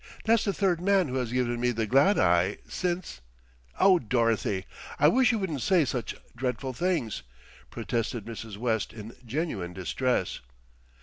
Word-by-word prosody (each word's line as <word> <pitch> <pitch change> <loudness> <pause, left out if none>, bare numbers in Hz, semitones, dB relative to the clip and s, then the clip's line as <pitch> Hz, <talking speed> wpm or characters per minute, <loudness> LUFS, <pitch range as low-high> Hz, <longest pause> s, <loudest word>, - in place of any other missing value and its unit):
That's 225 -1 +4
the 200 - +2
third 190 -4 +1
man 190 -4 +3
who 130 - -2
has 125 -3 -2
given 120 -1 0
me 125 +1 +2
the 115 -2 -1
glad 140 - +4
eye 90 +3 +3
since 180 - -3 0.3
" - - -26
"Oh, 190 -2 +6
Dorothy! 115 - 0 0.3
I - - +5
wish 250 -2 +4
you 225 - 0
wouldn't 170 - -3
say 180 -1 +3
such 125 -2 -3 0.2
dreadful 125 +1 -3
things," 155 - -1 0.5
protested 115 -1 -3
Mrs. 110 -3 -7
West 110 -2 -1
in 110 +1 -9
genuine 115 - -3
distress. 125 +8 -1
125 Hz, 160 wpm, -28 LUFS, 110-175 Hz, 0.5 s, Oh